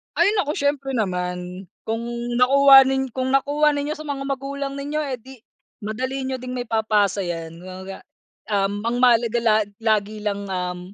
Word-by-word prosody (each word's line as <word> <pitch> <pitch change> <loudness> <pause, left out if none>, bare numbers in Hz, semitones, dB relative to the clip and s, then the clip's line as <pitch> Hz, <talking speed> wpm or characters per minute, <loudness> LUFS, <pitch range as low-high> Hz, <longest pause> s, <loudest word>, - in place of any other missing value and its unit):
Ay, 355 +5 +4
naku, 300 -6 0
siyempre 280 -2 -1
naman 180 -2 -3 0.2
kung 225 +1 -3 0.4
nakuha 270 +1 +8
nin 265 0 0
kung 260 +1 -2
nakuha 290 +2 +3
ninyo 290 +2 -2
sa 310 - -9
mga 275 -1 -3
magulang 275 0 -4
ninyo, 290 +2 -3
eh, 265 -3 -3
di 265 +3 -13 0.5
madali 260 +5 -3
niyo 260 -1 -3
din 250 0 -7
maipapasa 215 -4 +1
yan, 165 -1 -5
kumbaga, 190 +1 -8 0.5
um, 200 0 0 0.2
mahalaga 235 -1 +4
la 215 -2 +4 0.3
lagi 215 -1 +1
lang, 200 -1 -2
um, 180 -1 -3
245 Hz, 155 wpm, -22 LUFS, 200-275 Hz, 0.5 s, nakuha